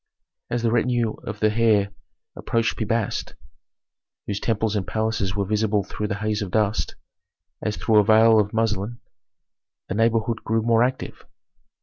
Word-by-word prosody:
As 120 Hz, -1 st, -2 dB
the 115 Hz, -, +2 dB
retinue 120 Hz, -1 st, +1 dB
of 105 Hz, -1 st, -5 dB
the 110 Hz, 0 st, +3 dB
heir 105 Hz, -3 st, +3 dB, 0.4 s
approached 115 Hz, -1 st, -1 dB
Pi 110 Hz, -, -3 dB
Bast, 115 Hz, -1 st, -2 dB, 0.9 s
whose 100 Hz, -1 st, -3 dB
temples 110 Hz, -1 st, 0 dB
and 100 Hz, -2 st, -2 dB
palaces 110 Hz, -3 st, -1 dB
were 100 Hz, -1 st, -1 dB
visible 105 Hz, 0 st, +1 dB
through 105 Hz, +3 st, -4 dB
the 100 Hz, -, -2 dB
haze 105 Hz, +1 st, -2 dB
of 100 Hz, -, -3 dB
dust, 105 Hz, +2 st, 0 dB, 0.7 s
as 105 Hz, -, -2 dB
through 110 Hz, -2 st, +3 dB
a -, -, +5 dB
veil 110 Hz, +1 st, +6 dB
of 105 Hz, -1 st, 0 dB
muslin, 110 Hz, 0 st, -1 dB, 0.9 s
the -, -, -1 dB
neighborhood 115 Hz, +1 st, +1 dB
grew 115 Hz, 0 st, 0 dB
more 115 Hz, 0 st, +3 dB
active. 130 Hz, +1 st, -3 dB
110 Hz, 155 wpm, -23 LUFS, 105-115 Hz, 0.9 s, veil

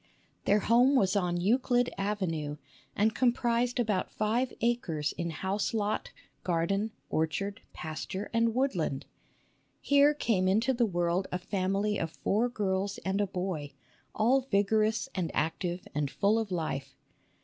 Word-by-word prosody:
Their 205 Hz, +1 st, +4 dB
home 245 Hz, +6 st, +4 dB
was 195 Hz, -6 st, +3 dB
on 180 Hz, -3 st, +1 dB
Euclid 245 Hz, +5 st, +2 dB
Avenue, 180 Hz, -7 st, -2 dB, 0.4 s
and 220 Hz, +2 st, +2 dB
comprised 240 Hz, 0 st, +1 dB
about 210 Hz, -6 st, 0 dB
five 230 Hz, +4 st, 0 dB
acres 220 Hz, -11 st, 0 dB
in 170 Hz, 0 st, -2 dB
house 190 Hz, +7 st, -2 dB
lot, 210 Hz, -1 st, -1 dB, 0.3 s
garden, 190 Hz, +5 st, 0 dB, 0.2 s
orchard, 195 Hz, +6 st, -1 dB
pasture, 175 Hz, +5 st, -5 dB
and 230 Hz, 0 st, +2 dB
woodland. 180 Hz, -, 0 dB, 0.7 s
Here 285 Hz, +1 st, +4 dB
came 200 Hz, -9 st, +1 dB
into 220 Hz, +7 st, +3 dB
the 240 Hz, -2 st, +2 dB
world 175 Hz, 0 st, 0 dB
a 180 Hz, -, 0 dB
family 195 Hz, +2 st, -1 dB
of 165 Hz, -, -2 dB
four 225 Hz, +5 st, +2 dB
girls 200 Hz, -3 st, -1 dB
and 190 Hz, +2 st, +1 dB
a 205 Hz, -, +1 dB
boy, 180 Hz, -6 st, -4 dB, 0.4 s
all 245 Hz, +5 st, +3 dB
vigorous 215 Hz, +3 st, +2 dB
and 180 Hz, -4 st, -1 dB
active 175 Hz, +3 st, -2 dB
and 145 Hz, -1 st, -1 dB
full 205 Hz, +9 st, +2 dB
of 220 Hz, -2 st, -3 dB
life. 140 Hz, -6 st, -3 dB
200 Hz, 140 wpm, -30 LUFS, 175-230 Hz, 0.7 s, Their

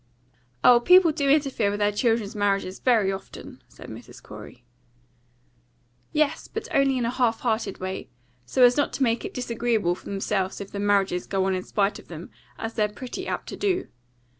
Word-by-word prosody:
"Oh, 245 Hz, -1 st, +7 dB
people 360 Hz, +5 st, +6 dB
do 285 Hz, -2 st, -1 dB
interfere 275 Hz, -7 st, +2 dB
with 205 Hz, -, -2 dB
their 205 Hz, 0 st, +2 dB
children's 225 Hz, -1 st, 0 dB
marriages 195 Hz, -2 st, -1 dB
very 220 Hz, -6 st, +3 dB
often," 195 Hz, -, -9 dB
said -, -, -13 dB
Mrs. -, -, -11 dB
Corey. 120 Hz, -, -12 dB, 1.5 s
"Yes, 300 Hz, -1 st, 0 dB
but -, -, -6 dB
only 275 Hz, -1 st, +3 dB
in 245 Hz, -, 0 dB
a 235 Hz, -, 0 dB
half 240 Hz, -3 st, 0 dB
hearted 220 Hz, -4 st, -1 dB
way, 185 Hz, 0 st, -5 dB, 0.3 s
so 250 Hz, -, +2 dB
as 245 Hz, 0 st, +7 dB
not 290 Hz, -, +1 dB
to 275 Hz, -, 0 dB
make 230 Hz, +4 st, 0 dB
it 400 Hz, -, -6 dB
disagreeable 230 Hz, -6 st, 0 dB
for -, -, -12 dB
themselves 195 Hz, -1 st, -2 dB
if 200 Hz, -, -8 dB
the 200 Hz, -, -5 dB
marriages 200 Hz, -3 st, +1 dB
go 190 Hz, -1 st, 0 dB
on 190 Hz, -, +1 dB
in 185 Hz, -, -1 dB
spite 200 Hz, +2 st, -1 dB
of -, -, -16 dB
them, 170 Hz, 0 st, -9 dB, 0.3 s
as 225 Hz, 0 st, -5 dB
they're 210 Hz, -2 st, +1 dB
pretty 245 Hz, +4 st, -7 dB
apt -, -, -4 dB
to -, -, -6 dB
do. 375 Hz, -2 st, -1 dB
220 Hz, 190 wpm, -25 LUFS, 195-255 Hz, 1.5 s, Oh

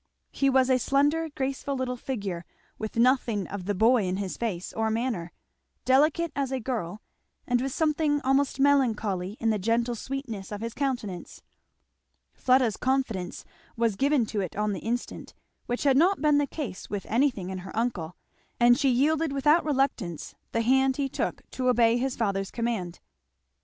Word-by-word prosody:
He 275 Hz, -, +1 dB
was 265 Hz, -1 st, +3 dB
a 255 Hz, -, +4 dB
slender 290 Hz, +6 st, +1 dB
graceful 275 Hz, 0 st, -3 dB
little 255 Hz, -1 st, -2 dB
figure, 200 Hz, -9 st, -4 dB, 0.4 s
with 215 Hz, -1 st, -5 dB
nothing 235 Hz, -5 st, +2 dB
of 195 Hz, -2 st, -6 dB
the 205 Hz, +1 st, -1 dB
boy 225 Hz, +2 st, +4 dB
in 185 Hz, +1 st, -1 dB
his 195 Hz, -2 st, -3 dB
face 195 Hz, -7 st, -4 dB
or 220 Hz, 0 st, 0 dB
manner; 220 Hz, -7 st, -2 dB, 0.5 s
delicate 305 Hz, +5 st, +3 dB
as 275 Hz, -2 st, -1 dB
a 265 Hz, -, -1 dB
girl, 215 Hz, -6 st, -4 dB, 0.4 s
and 245 Hz, -1 st, +1 dB
with 270 Hz, +1 st, -2 dB
something 305 Hz, 0 st, +1 dB
almost 270 Hz, 0 st, +1 dB
melancholy 220 Hz, -8 st, +1 dB
in 225 Hz, -1 st, +2 dB
the 215 Hz, -, 0 dB
gentle 230 Hz, +4 st, +1 dB
sweetness 235 Hz, -5 st, -6 dB
of 205 Hz, 0 st, -5 dB
his 230 Hz, 0 st, -4 dB
countenance. 240 Hz, -11 st, -4 dB, 0.9 s
Fleda's 255 Hz, -4 st, +2 dB
confidence 250 Hz, -9 st, -1 dB, 0.3 s
was 230 Hz, -3 st, +1 dB
given 275 Hz, +1 st, +2 dB
to 210 Hz, -1 st, -2 dB
it 185 Hz, -, -5 dB
on 210 Hz, 0 st, 0 dB
the 190 Hz, -, -4 dB
instant, 240 Hz, +2 st, -4 dB, 0.3 s
which 245 Hz, -, -2 dB
had 275 Hz, -2 st, +4 dB
not 365 Hz, +6 st, +4 dB
been 295 Hz, 0 st, +3 dB
the 290 Hz, -, +1 dB
case 245 Hz, -, -6 dB
with 205 Hz, -2 st, -4 dB
anything 230 Hz, -7 st, +1 dB
in 190 Hz, -, -4 dB
her 190 Hz, +3 st, -9 dB
uncle, 195 Hz, -8 st, -2 dB, 0.4 s
and 240 Hz, +1 st, +5 dB
she 280 Hz, -2 st, +3 dB
yielded 300 Hz, +5 st, +2 dB
without 295 Hz, +4 st, +3 dB
reluctance 270 Hz, -, -1 dB, 0.2 s
the 230 Hz, -, 0 dB
hand 265 Hz, +2 st, +3 dB
he 280 Hz, -1 st, 0 dB
took -, -, -4 dB
to 255 Hz, -1 st, 0 dB
obey 235 Hz, -1 st, +4 dB
his 260 Hz, +1 st, -1 dB
father's 195 Hz, -4 st, -1 dB
command. 225 Hz, -8 st, -3 dB
245 Hz, 170 wpm, -27 LUFS, 210-270 Hz, 0.9 s, and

